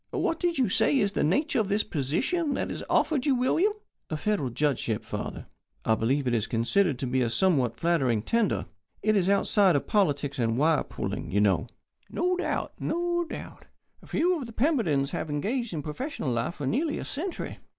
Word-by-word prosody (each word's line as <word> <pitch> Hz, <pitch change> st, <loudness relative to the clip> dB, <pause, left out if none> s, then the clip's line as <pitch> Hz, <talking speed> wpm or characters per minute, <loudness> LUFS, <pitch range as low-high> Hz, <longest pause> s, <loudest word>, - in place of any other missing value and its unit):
What 330 Hz, -, -1 dB
did 345 Hz, -1 st, 0 dB
you 260 Hz, -3 st, +3 dB
say 235 Hz, +8 st, +3 dB
is 200 Hz, -5 st, +2 dB
the -, -, 0 dB
nature 245 Hz, -, +1 dB
of 215 Hz, -, +1 dB
this 210 Hz, +1 st, +2 dB
position 265 Hz, -, -1 dB
that -, -, -2 dB
is -, -, -5 dB
offered 300 Hz, -3 st, +2 dB
you, 275 Hz, -, +4 dB
William?" 325 Hz, +12 st, +2 dB, 0.4 s
"A 155 Hz, -, -2 dB
Federal 200 Hz, -7 st, 0 dB
Judgeship, 120 Hz, -4 st, -1 dB
father. -, -, -5 dB, 0.4 s
I 110 Hz, -, +4 dB
believe 130 Hz, +6 st, +1 dB
it 120 Hz, -, +1 dB
is 115 Hz, -1 st, 0 dB
considered 135 Hz, -, +1 dB
to 130 Hz, -, -3 dB
be 130 Hz, +1 st, 0 dB
a 120 Hz, -, +1 dB
somewhat 125 Hz, -4 st, +2 dB
flattering 135 Hz, -11 st, +1 dB
tender. 230 Hz, -, +1 dB, 0.4 s
It 215 Hz, +1 st, +3 dB
is 190 Hz, -2 st, +2 dB
outside 200 Hz, -2 st, +4 dB
of 140 Hz, -, 0 dB
politics 145 Hz, -8 st, +1 dB
and 115 Hz, -1 st, +1 dB
wire 155 Hz, +3 st, +3 dB
pulling, -, -, -4 dB
you 100 Hz, -, +1 dB
know." 95 Hz, -6 st, +2 dB, 0.4 s
"No 360 Hz, +1 st, 0 dB
doubt, 365 Hz, -, -2 dB
no 345 Hz, +1 st, 0 dB
doubt. 320 Hz, -, -9 dB, 0.4 s
Few 350 Hz, +1 st, +1 dB
of 255 Hz, -, -6 dB
the 230 Hz, -, -10 dB
Pembertons 215 Hz, -, +1 dB
have 170 Hz, -2 st, -3 dB
engaged 215 Hz, -, -1 dB
in 155 Hz, -4 st, -4 dB
professional 160 Hz, -, -4 dB
life 120 Hz, +7 st, -1 dB
for 145 Hz, -, -5 dB
nearly 295 Hz, -, 0 dB
a -, -, -5 dB
century. 340 Hz, +6 st, -5 dB
185 Hz, 190 wpm, -27 LUFS, -, 0.4 s, you